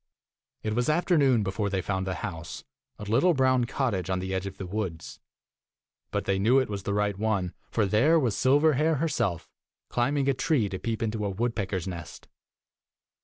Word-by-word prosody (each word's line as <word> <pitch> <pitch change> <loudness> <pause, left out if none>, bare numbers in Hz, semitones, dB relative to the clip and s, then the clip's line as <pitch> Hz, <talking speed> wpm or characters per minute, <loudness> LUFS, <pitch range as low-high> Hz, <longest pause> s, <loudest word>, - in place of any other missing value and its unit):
It 110 - -1
was 120 +5 0
afternoon 150 - +3
before 100 +1 -1
they 95 -2 -1
found 95 -1 -2
the 95 - -2
house, 85 -4 -7 0.3
a - - -8
little 130 - +3
brown 130 -2 +3
cottage 110 -9 -1
on 95 - +1
the 95 +1 -3
edge 95 +1 -2
of 95 - -8
the 95 - -5
woods; 90 -4 -5 0.9
but - - -2
they 95 -1 +1
knew 115 +7 +4
it 130 -5 +1
was 100 -1 -3
the 100 - -2
right 105 -1 +1
one, 100 -5 0 0.2
for 110 - +1
there 125 - +4
was 125 -8 +1
Silverhair 150 +3 +3
herself, 115 - -1 0.4
climbing 140 +3 +1
a 140 - +4
tree 135 -3 +1
to 95 - -5
peep 115 -1 -2
into 110 -1 -2
a 100 - 0
woodpecker's 100 -3 -2
nest. 85 -4 -8
110 Hz, 180 wpm, -27 LUFS, 95-130 Hz, 0.9 s, knew